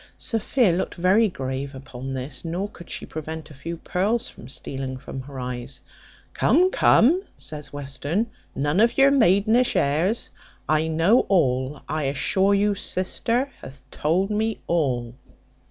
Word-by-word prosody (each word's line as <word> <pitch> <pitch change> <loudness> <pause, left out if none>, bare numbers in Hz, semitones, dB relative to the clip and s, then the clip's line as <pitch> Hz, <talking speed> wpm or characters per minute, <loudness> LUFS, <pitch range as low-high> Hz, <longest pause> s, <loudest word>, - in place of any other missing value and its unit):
Sophia 225 -2 +2
looked 175 +3 -2
very 190 +6 +4
grave 135 -2 -4
upon 130 -1 -7
this, 130 +3 -4
nor 175 +4 -2
could 175 -4 -14
she - - -3
prevent 160 0 -7
a - - -10
few 165 +5 -6
pearls 215 +9 0
from 120 - -11
stealing 135 0 -3
into 130 0 -7
her 140 -2 -8
eyes. 125 0 -5 0.5
"Come, 365 +2 +3
come," 325 - +5 0.2
says 150 -1 -5
Western, 145 - -2 0.3
"none 145 +6 +1
of 230 +2 +3
your 275 0 +6
maidenish 225 0 +4
airs; 165 +11 +1 0.4
I 155 +2 +2
know 165 +9 +4
all; 135 -6 +1
I 155 -1 -2
assure 190 +8 +2
you 205 +1 +2
sister 230 +8 -1
hath 130 -1 -11
told 180 +7 0
me 220 +1 0
all." 125 -8 0
165 Hz, 145 wpm, -24 LUFS, 135-205 Hz, 0.5 s, your